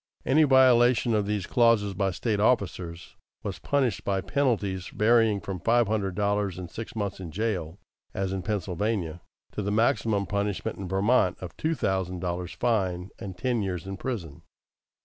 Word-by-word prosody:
Any 155 Hz, +4 st, +5 dB
violation 125 Hz, -3 st, +5 dB
of 105 Hz, -2 st, +1 dB
these 105 Hz, -3 st, -1 dB
clauses 115 Hz, -4 st, +3 dB
by 100 Hz, +1 st, 0 dB
State 105 Hz, +3 st, -1 dB
officers 90 Hz, -6 st, 0 dB, 0.3 s
was -, -, -4 dB
punished 130 Hz, -9 st, 0 dB
by 100 Hz, -1 st, 0 dB
penalties 100 Hz, -4 st, 0 dB
varying 110 Hz, -1 st, +3 dB
from 95 Hz, -2 st, -5 dB
five 115 Hz, +4 st, +3 dB
hundred 100 Hz, -4 st, -1 dB
dollars 100 Hz, -3 st, 0 dB
and 90 Hz, -2 st, -7 dB
six 115 Hz, 0 st, -7 dB
months 100 Hz, -3 st, -3 dB
in 90 Hz, -3 st, -6 dB
jail, 90 Hz, -3 st, -2 dB, 0.3 s
as 95 Hz, 0 st, -2 dB
in 95 Hz, -, -2 dB
Pennsylvania, 95 Hz, -3 st, -2 dB, 0.3 s
to -, -, -4 dB
the 100 Hz, -, -2 dB
maximum 105 Hz, -2 st, +2 dB
punishment 100 Hz, +1 st, -2 dB
in 95 Hz, -, -5 dB
Vermont, 95 Hz, 0 st, +2 dB
of 90 Hz, -2 st, -8 dB
two 160 Hz, +1 st, -1 dB
thousand 95 Hz, -, -1 dB
dollars' 90 Hz, -1 st, -3 dB
fine 95 Hz, -6 st, -1 dB
and 95 Hz, -2 st, -7 dB
ten 125 Hz, +1 st, 0 dB
years 90 Hz, -4 st, -3 dB
in 95 Hz, 0 st, -5 dB
prison. 95 Hz, -, -5 dB
100 Hz, 165 wpm, -27 LUFS, 95-115 Hz, 0.3 s, Any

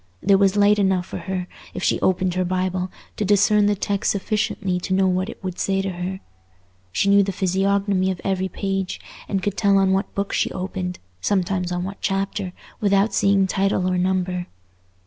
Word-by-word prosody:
There 195 Hz, 0 st, +5 dB
was 195 Hz, -1 st, +3 dB
light 205 Hz, +1 st, +5 dB
enough 190 Hz, -2 st, +2 dB
for -, -, -6 dB
her, 180 Hz, +1 st, -3 dB, 0.3 s
if -, -, -4 dB
she -, -, +2 dB
opened 185 Hz, -1 st, +1 dB
her 185 Hz, +1 st, 0 dB
Bible, 185 Hz, 0 st, -1 dB, 0.3 s
to -, -, 0 dB
discern 205 Hz, +1 st, +4 dB
the 205 Hz, -, +2 dB
text 200 Hz, +1 st, 0 dB
sufficiently 200 Hz, -2 st, -1 dB
to 185 Hz, +1 st, -1 dB
know 190 Hz, 0 st, +3 dB
what 185 Hz, +2 st, 0 dB
it -, -, -10 dB
would 185 Hz, -1 st, -4 dB
say 195 Hz, 0 st, +1 dB
to 195 Hz, -, -2 dB
her. 180 Hz, +2 st, -4 dB, 0.7 s
She 110 Hz, -, +1 dB
knew 200 Hz, 0 st, +6 dB
the 195 Hz, 0 st, 0 dB
physiognomy 195 Hz, +1 st, +1 dB
of 185 Hz, -2 st, -3 dB
every 190 Hz, -1 st, -1 dB
page, 195 Hz, 0 st, -3 dB, 0.3 s
and 195 Hz, -2 st, -1 dB
could 205 Hz, 0 st, -1 dB
tell 200 Hz, -2 st, +4 dB
on 195 Hz, -1 st, +3 dB
what 195 Hz, +2 st, -1 dB
book 200 Hz, 0 st, -2 dB
she -, -, +1 dB
opened, 185 Hz, -1 st, -4 dB, 0.2 s
sometimes 185 Hz, -2 st, 0 dB
on 175 Hz, 0 st, -1 dB
what 195 Hz, +2 st, -6 dB
chapter, 195 Hz, -1 st, -1 dB, 0.3 s
without 200 Hz, +1 st, +2 dB
seeing 195 Hz, -1 st, +3 dB
title 190 Hz, -1 st, +1 dB
or 180 Hz, -1 st, +1 dB
number. 180 Hz, -1 st, 0 dB
190 Hz, 190 wpm, -22 LUFS, 185-200 Hz, 0.7 s, knew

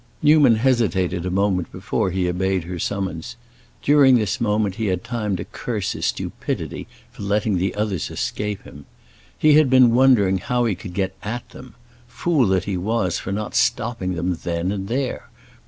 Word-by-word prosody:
Newman 145 Hz, -5 st, +6 dB
hesitated 95 Hz, -7 st, +1 dB
a -, -, 0 dB
moment 95 Hz, -1 st, 0 dB
before -, -, -2 dB
he 90 Hz, 0 st, -1 dB
obeyed 95 Hz, 0 st, 0 dB
her 90 Hz, +1 st, -6 dB
summons, 95 Hz, 0 st, -3 dB, 0.5 s
during 140 Hz, -3 st, +6 dB
this 110 Hz, +1 st, 0 dB
moment 105 Hz, -3 st, +1 dB
he 110 Hz, +2 st, -3 dB
had 90 Hz, -2 st, -1 dB
time 110 Hz, -4 st, -2 dB
to -, -, -5 dB
curse -, -, -4 dB
his -, -, -2 dB
stupidity -, -, -4 dB, 0.2 s
for -, -, -12 dB
letting 100 Hz, -1 st, 0 dB
the 95 Hz, +2 st, -1 dB
others 105 Hz, -5 st, -2 dB
escape 105 Hz, -1 st, -3 dB
him. 70 Hz, -1 st, -13 dB, 0.5 s
He 155 Hz, -1 st, +4 dB
had 155 Hz, -4 st, +4 dB
been 130 Hz, -2 st, +6 dB
wondering 120 Hz, -7 st, +4 dB
how 120 Hz, +5 st, 0 dB
he 110 Hz, -, +1 dB
could 90 Hz, -1 st, -9 dB
get 95 Hz, -2 st, -1 dB
at 120 Hz, +4 st, -5 dB
them; 130 Hz, -, -13 dB, 0.3 s
fool 145 Hz, -2 st, +1 dB
that 95 Hz, -1 st, +1 dB
he 100 Hz, -3 st, -3 dB
was 95 Hz, -2 st, -1 dB
for 95 Hz, -, -5 dB
not 105 Hz, +2 st, -3 dB
stopping 115 Hz, -7 st, 0 dB
them 85 Hz, 0 st, -2 dB
then 85 Hz, +2 st, -2 dB
and 95 Hz, -1 st, -4 dB
there! 130 Hz, +3 st, -3 dB
100 Hz, 175 wpm, -22 LUFS, 95-120 Hz, 0.5 s, Newman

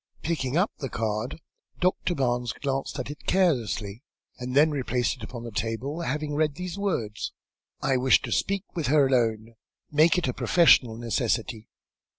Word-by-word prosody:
Picking 150 Hz, -4 st, -1 dB
up 195 Hz, +5 st, +2 dB
the 135 Hz, -, -4 dB
card, 110 Hz, +5 st, -3 dB, 0.4 s
Doctor 180 Hz, -1 st, +1 dB
Barnes 120 Hz, -3 st, 0 dB
glanced 135 Hz, -1 st, -3 dB
at -, -, -4 dB
it 150 Hz, -, -12 dB
carelessly, 120 Hz, -, +1 dB, 0.4 s
and 125 Hz, +1 st, -4 dB
then 155 Hz, +2 st, +5 dB
replaced 130 Hz, -2 st, -1 dB
it -, -, -17 dB
upon 120 Hz, +1 st, -7 dB
the 120 Hz, -, -7 dB
table, 115 Hz, +9 st, -3 dB
having 150 Hz, -1 st, -2 dB
read 150 Hz, -1 st, +1 dB
these 180 Hz, +1 st, -5 dB
words 145 Hz, -, -2 dB, 0.5 s
"I 135 Hz, -1 st, +2 dB
wish 130 Hz, +1 st, +5 dB
to -, -, -5 dB
speak 200 Hz, -1 st, 0 dB
with 165 Hz, -4 st, -1 dB
her 145 Hz, +1 st, +5 dB
alone. 115 Hz, -3 st, +1 dB, 0.4 s
Make 155 Hz, +4 st, +4 dB
it 180 Hz, -, 0 dB
a 125 Hz, -, -1 dB
professional 130 Hz, -10 st, +4 dB
necessity." 115 Hz, -1 st, -2 dB
130 Hz, 165 wpm, -26 LUFS, 115-155 Hz, 0.5 s, then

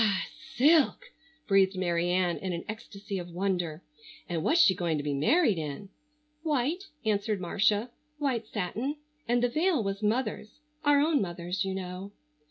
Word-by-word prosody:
silk!" 315 Hz, -, +4 dB, 0.3 s
breathed 195 Hz, -1 st, +4 dB
Mary 175 Hz, -1 st, 0 dB
Ann 180 Hz, -1 st, +1 dB
in 185 Hz, -2 st, -3 dB
an 170 Hz, -, -5 dB
ecstasy 200 Hz, -2 st, -6 dB
of 175 Hz, 0 st, -7 dB
wonder. 175 Hz, -3 st, -2 dB, 0.4 s
"And 165 Hz, -2 st, -2 dB
what's 330 Hz, -, +3 dB
she 195 Hz, -, +7 dB
going 170 Hz, -4 st, -1 dB
to 145 Hz, -, -3 dB
be 145 Hz, -1 st, -1 dB
married 200 Hz, -, +3 dB
in?" 155 Hz, +6 st, -5 dB, 0.5 s
"White," 310 Hz, +4 st, 0 dB, 0.2 s
answered 210 Hz, -1 st, +1 dB
Marcia, 210 Hz, +5 st, +1 dB, 0.3 s
"white 255 Hz, -7 st, -1 dB
satin. 220 Hz, +9 st, -2 dB, 0.3 s
And 240 Hz, +1 st, +2 dB
the -, -, +5 dB
veil 310 Hz, +1 st, +1 dB
was 195 Hz, +1 st, -3 dB
mother's—our 285 Hz, +7 st, 0 dB
own 300 Hz, -1 st, +3 dB
mother's, 175 Hz, 0 st, -2 dB
you 190 Hz, 0 st, -2 dB
know." 185 Hz, +1 st, -6 dB
200 Hz, 150 wpm, -29 LUFS, 180-265 Hz, 0.5 s, she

